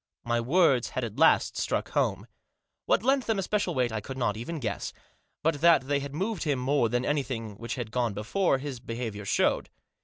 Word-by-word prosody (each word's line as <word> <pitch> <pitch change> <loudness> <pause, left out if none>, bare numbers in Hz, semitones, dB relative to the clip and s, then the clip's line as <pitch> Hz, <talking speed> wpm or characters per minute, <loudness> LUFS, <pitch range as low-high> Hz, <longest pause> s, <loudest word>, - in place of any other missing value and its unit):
My 120 0 0
words 135 -2 +3
had 130 - -3
at 115 -3 -5
last - - +4
struck - - -1
home. - - 0 0.6
What - - +3
lent 270 +1 +2
them 225 -2 +1
especial 195 -2 0
weight 125 -2 +1
I 110 -1 -3
could 130 +5 -7
not 115 -5 0
even 120 +10 -5
guess. 105 -6 -3 0.5
But 155 -2 +1
that 170 -4 +6
they 140 +1 +1
had 140 0 -6
moved 195 +4 -2
him 145 -4 +1
more 130 -1 +1
than 120 +2 0
anything 130 -7 -2
which 115 +1 -4
had 120 -4 -5
gone 120 -4 0
before 135 - +1
his 135 -2 -6
behaviour 115 -3 -5
showed. - - +1
130 Hz, 195 wpm, -28 LUFS, 115-160 Hz, 0.6 s, that